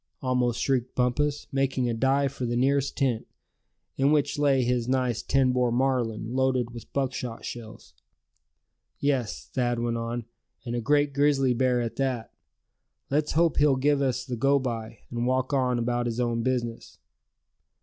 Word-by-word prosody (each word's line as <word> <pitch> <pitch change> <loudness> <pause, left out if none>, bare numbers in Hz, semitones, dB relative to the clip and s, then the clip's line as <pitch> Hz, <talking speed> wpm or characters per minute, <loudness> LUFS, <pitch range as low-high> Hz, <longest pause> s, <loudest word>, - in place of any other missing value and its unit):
almost 125 -2 +1
shrieked 130 -2 0
Bumpus, 145 +4 0
making 135 -2 0
a 120 - 0
dive 135 +3 +2
for 130 -2 -3
the 120 - -1
nearest 140 +2 +1
tent, 125 -5 0 0.7
in 135 +2 +3
which 145 -1 +1
lay 140 -3 +3
his 120 -1 0
nice 125 -3 0
ten 135 -2 +2
bore 125 -1 +2
Marlin, 120 -3 0
loaded 130 -2 +1
with 120 -1 -10
buckshot 130 -4 -3
shells. 115 - -9 1.0
"Yes," 120 - -1
Thad 120 -2 0
went 120 0 -1
on, 115 0 -3 0.4
"and 120 -1 -3
a 120 - -1
great 145 +4 +3
big - - -19
grizzly 140 -3 +3
bear 125 0 +2
at 115 -1 -4
that. 130 -4 -2 0.8
Let's 150 +2 +1
hope 165 +1 +2
he'll 145 -2 +4
give 140 +2 +2
us 130 -3 0
the 125 -3 -3
go 140 +4 +3
by, 115 -4 -4
and 120 0 -1
walk 130 +2 0
on 125 -2 +2
about 120 0 0
his 115 0 -3
own 120 -1 0
business!" 120 -2 -3
125 Hz, 165 wpm, -27 LUFS, 120-135 Hz, 1.0 s, he'll